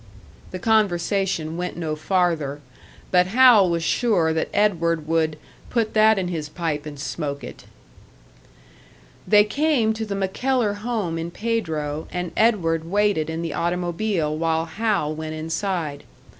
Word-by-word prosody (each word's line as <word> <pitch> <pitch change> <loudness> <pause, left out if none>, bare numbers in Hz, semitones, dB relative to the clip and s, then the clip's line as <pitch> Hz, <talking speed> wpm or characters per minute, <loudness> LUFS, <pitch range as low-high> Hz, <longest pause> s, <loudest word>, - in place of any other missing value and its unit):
The 185 - -5
conversation 190 -5 +1
went 180 0 -4
no 160 -3 -2
farther 155 -4 0 0.5
but 180 -1 +4
Hal 225 -3 +6
was 170 -1 -1
sure 175 -5 +2
that 160 - -1
Edward 170 -6 +1
would 160 -1 +1 0.3
"put 230 -3 0
that 220 0 +5
in 185 -2 -1
his 155 -4 -4
pipe 155 -3 -3
and 145 -2 -8
smoke 145 -1 -4
it." - - -10 1.6
They 210 -1 +6
came 250 -1 +1
to 220 0 -4
the 200 - -3
MacKellar 210 +4 0
home 205 -7 -2
in 165 +1 -4
Pedro, 160 -9 -3
and 180 -1 -3
Edward 165 -8 +2
waited 200 -5 +1
in 160 +1 -3
the 165 - -3
automobile 175 -1 -1
while 160 0 0
Hal 165 -3 -1
went 155 0 -5
inside. 160 -2 -3
175 Hz, 140 wpm, -23 LUFS, 160-210 Hz, 1.6 s, Hal